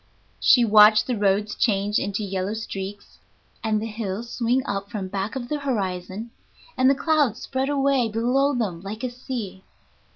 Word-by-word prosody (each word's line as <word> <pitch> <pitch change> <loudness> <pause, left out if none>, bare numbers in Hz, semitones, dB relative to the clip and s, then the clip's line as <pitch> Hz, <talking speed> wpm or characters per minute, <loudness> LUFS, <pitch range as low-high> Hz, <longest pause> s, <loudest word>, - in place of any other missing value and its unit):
She 245 -2 +5
watched 215 0 +7
the 250 - -1
roads 205 0 +1
change 205 -1 +1
into 200 +1 -2
yellow 195 +1 -2
streaks, 200 -2 -7 0.4
and 215 -1 +1
the 220 - -4
hills 220 0 -5
swing 250 +3 +1
up 200 -3 -3
from 195 -3 -5
back 200 +4 -3
of 245 -2 -4
the 300 +3 -2
horizon, 205 -4 -3 0.4
and 260 +1 +4
the 275 - +4
clouds 290 -7 +1
spread 265 +1 -2
away 275 -4 +2
below 255 +6 +1
them 195 -8 -2
like 210 +4 -7
a 250 - -2
sea. 230 -7 -6
220 Hz, 165 wpm, -24 LUFS, 200-250 Hz, 0.4 s, watched